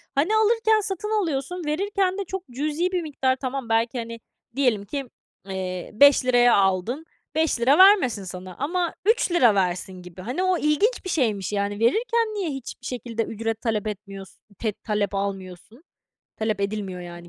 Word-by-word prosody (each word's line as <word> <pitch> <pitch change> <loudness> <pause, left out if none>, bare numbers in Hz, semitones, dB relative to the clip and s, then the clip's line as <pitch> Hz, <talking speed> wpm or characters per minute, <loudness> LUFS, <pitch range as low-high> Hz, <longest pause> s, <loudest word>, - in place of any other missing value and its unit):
Hani, 325 +10 +2
alırken 440 0 +3
satın 420 +3 -1
alıyorsun, 325 +1 -3
verirken 380 +4 0
de 400 - -3
çok 380 +1 -5
cüzi 305 +7 -1
bir 360 -2 0
miktar, 270 -4 0
tamam, 260 -2 -4
belki, 230 +2 +1
hani, 230 0 -6 0.4
diyelim 245 -7 +1
ki, 275 +3 -5 0.4
eee, 185 -1 -4
₺5 250 -1 +5
aldın, 195 - +1 0.3
₺5 285 -4 +3
vermesin 370 - +6
sana 185 0 -8
ama 345 +5 -1
₺3 345 - +4
versin 185 0 -1
gibi. 180 0 -11
Hani 250 - -2
o 370 -1 +2
ilginç 350 +11 +1
bir - - -3
şeymiş 215 - 0
yani 205 0 -1
verirken 450 - +1
niye 395 -5 -2
hiçbir 270 -2 -7
şekilde 235 -2 -3
ücret 225 0 -4
talep 220 -3 -1
etmiyorsun, 195 -2 -8 0.2
te 220 - 0
talep 210 -1 -2
almıyorsun? 195 - -5 0.5
Talep 215 -2 -1
edilmiyor, 200 -2 -3
yani 175 0 -10
245 Hz, 155 wpm, -24 LUFS, -, 0.5 s, vermesin